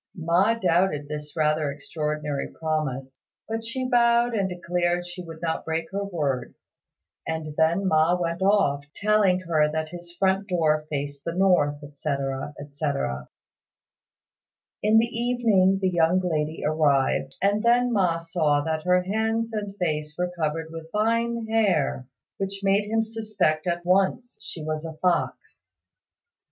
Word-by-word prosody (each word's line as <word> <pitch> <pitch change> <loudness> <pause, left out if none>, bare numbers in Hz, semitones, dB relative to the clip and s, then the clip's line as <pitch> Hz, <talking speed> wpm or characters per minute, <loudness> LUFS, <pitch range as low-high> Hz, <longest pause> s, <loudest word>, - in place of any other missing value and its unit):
Ma 175 +6 +2
doubted 175 -7 +1
this 150 0 -6
rather 155 -1 +1
extraordinary 150 0 -3
promise, 135 -5 -3 0.3
but 225 0 -3
she 255 +3 -2
vowed 240 -1 +3
and 195 -4 0
declared 175 0 -1
she 175 +1 -7
would 165 -2 -10
not 160 -1 -1
break 165 0 -3
her 200 +1 -2
word; 145 -10 -2 0.7
and 160 -2 -3
then 165 +5 +2
Ma 160 +1 +3
went 170 +1 -2
off, 190 -8 +3
telling 205 -3 +3
her 155 -4 +2
that 155 0 -2
his 175 0 -9
front 195 +1 +1
door 155 -4 +1
faced 145 -1 -4
the 170 - -4
north, 150 -6 +2
etc., 140 -1 -3
etc. 140 - -3 1.5
In 215 +1 +4
the 225 - +5
evening 230 -5 +2
the 190 -1 +1
young 170 +1 +3
lady 160 -3 -2
arrived, 140 -3 +1
and 205 +2 +2
then 240 +1 +3
Ma 180 -5 +2
saw 165 -3 +1
that 160 +1 -2
her 180 +2 +3
hands 225 +3 -1
and 205 -2 -4
face 150 -4 -2
were 180 0 -1
covered 160 0 -2
with 165 0 -8
fine 230 +2 0
hair, 195 - +1 0.3
which 195 0 -3
made 200 +1 +2
him 225 0 +2
suspect 215 -8 -1
at 175 0 -1
once 195 +7 +1
she 160 - -7
was 155 0 -3
a 165 -1 -6
fox. 175 +3 -2
170 Hz, 145 wpm, -25 LUFS, 155-200 Hz, 1.5 s, the